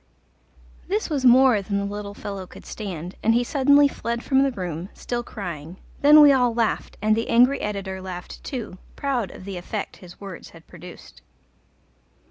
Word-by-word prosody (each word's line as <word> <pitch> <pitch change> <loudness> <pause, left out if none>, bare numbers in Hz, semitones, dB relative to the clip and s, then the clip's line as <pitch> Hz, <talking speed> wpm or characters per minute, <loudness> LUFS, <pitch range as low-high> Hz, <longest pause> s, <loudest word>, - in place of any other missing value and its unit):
This 400 -2 -2
was 275 -3 -1
more 250 -3 +6
than 200 +1 -2
the 200 - -1
little 205 0 -6
fellow 200 -3 -6
could - - -14
stand, 180 -4 -6
and 225 +1 +3
he 240 - +3
suddenly 285 +2 +4
fled 235 -3 -4
from 270 -1 +3
the 275 - +3
room, 180 -4 -5
still 240 -1 -3
crying; 175 -7 -7 0.2
then 300 +2 +8
we 290 -1 +8
all 245 -3 +2
laughed, 230 -2 -1
and 215 0 +3
the 230 - -2
angry 250 +4 +4
editor 195 -2 -4
laughed 180 -1 -8
too, 230 -9 -6 0.2
proud 255 -8 -1
of 185 - -12
the 195 -2 -6
effect 195 +4 -5
his 175 -2 -14
words 195 -4 -9
had 165 - -18
produced. 175 0 -13
210 Hz, 175 wpm, -23 LUFS, 185-255 Hz, 0.2 s, then